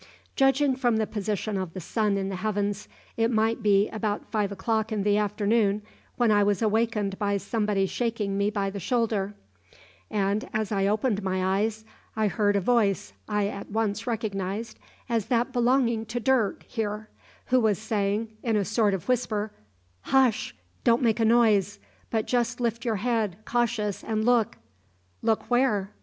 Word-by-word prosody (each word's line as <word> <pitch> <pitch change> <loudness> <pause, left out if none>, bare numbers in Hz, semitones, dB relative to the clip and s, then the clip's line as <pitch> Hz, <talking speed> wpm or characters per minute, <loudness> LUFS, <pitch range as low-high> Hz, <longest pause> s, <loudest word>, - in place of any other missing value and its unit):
"Judging 270 0 +3
from 245 -4 +1
the 220 - +1
position 210 0 -2
of 185 -3 -5
the - - -4
sun 205 +3 0
in 195 0 -2
the 190 - -4
heavens, 205 0 -2 0.3
it 225 0 +2
might 225 0 +1
be 205 0 +4
about 215 -2 -2
five 210 -3 0
o'clock 220 +3 -1
in 210 -2 -1
the 205 0 +3
afternoon 210 0 +1 0.3
when 240 -3 +3
I 205 -1 +4
was 205 +1 +1
awakened 215 -2 0
by 200 -1 +1
somebody 210 -2 0
shaking 220 -2 -2
me 200 +1 +1
by 200 -2 -1
the 200 - -5
shoulder, 210 -1 0 0.7
and 205 0 -1
as 215 -1 -1
I 195 -1 +1
opened 210 0 +1
my 190 0 0
eyes 220 +1 -2 0.3
I 215 -1 +1
heard 205 -1 +1
a - - +4
voice 200 - +1 0.2
I 210 -1 +1
at 200 -1 -6
once 220 +1 -1
recognised 215 -1 -3 0.3
as 230 -4 -1
that 245 +1 +1
belonging 240 -2 +2
to 235 +2 -3
Dirk 240 -4 +1
here, 215 -2 -4 0.4
who 255 - +7
was 215 -5 +2
saying, 215 0 -1
in 230 -2 0
a 205 -2 +1
sort 210 -1 +2
of 180 - -7
whisper: 220 -4 0 0.6
"`Hush! 255 -1 +2 0.3
don't 235 +1 +3
make 225 -1 +2
a 225 - +3
noise, 215 -4 +3 0.3
but 220 -2 0
just 245 0 0
lift 235 -1 -1
your 230 -2 +1
head, 215 -3 0
cautious, 225 -4 -1
and 220 -1 -1
look.' 235 -2 +2 0.7
"`Look 220 -1 +2
where?' 245 -6 +1
215 Hz, 170 wpm, -26 LUFS, 200-230 Hz, 0.7 s, who